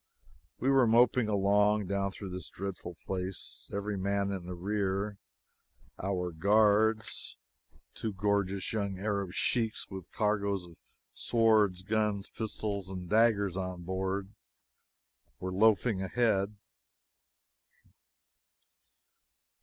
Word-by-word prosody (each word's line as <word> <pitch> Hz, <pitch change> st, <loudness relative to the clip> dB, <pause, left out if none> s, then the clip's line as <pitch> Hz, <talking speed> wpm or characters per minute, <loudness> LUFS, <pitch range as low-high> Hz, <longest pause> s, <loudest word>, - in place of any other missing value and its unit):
We 135 Hz, +3 st, +1 dB
were 135 Hz, -3 st, +5 dB
moping 120 Hz, +1 st, +4 dB
along 105 Hz, +1 st, +3 dB
down 100 Hz, +1 st, -1 dB
through 95 Hz, -1 st, -8 dB
this 90 Hz, 0 st, -6 dB
dreadful 95 Hz, -2 st, -6 dB
place, 95 Hz, 0 st, -4 dB
every 100 Hz, 0 st, -2 dB
man 100 Hz, +1 st, 0 dB
in 95 Hz, -3 st, -5 dB
the 90 Hz, -, -5 dB
rear. 100 Hz, +2 st, -1 dB, 0.8 s
Our 90 Hz, -2 st, -1 dB
guards 105 Hz, +5 st, +2 dB, 0.6 s
two 110 Hz, -, -3 dB
gorgeous 100 Hz, 0 st, 0 dB
young 100 Hz, -3 st, -1 dB
Arab 100 Hz, -2 st, -2 dB
sheiks, 110 Hz, +1 st, 0 dB
with 95 Hz, -3 st, -8 dB
cargoes 100 Hz, -3 st, 0 dB
of 85 Hz, -1 st, -14 dB, 0.4 s
swords, 110 Hz, -5 st, +3 dB
guns, 105 Hz, -1 st, 0 dB
pistols 105 Hz, -3 st, -3 dB
and 90 Hz, -2 st, -6 dB
daggers 105 Hz, -3 st, +3 dB
on 90 Hz, -2 st, -4 dB
board 95 Hz, +2 st, -2 dB, 1.1 s
were 95 Hz, 0 st, -4 dB
loafing 110 Hz, 0 st, +3 dB
ahead. 105 Hz, 0 st, +1 dB
100 Hz, 105 wpm, -31 LUFS, 95-105 Hz, 1.1 s, were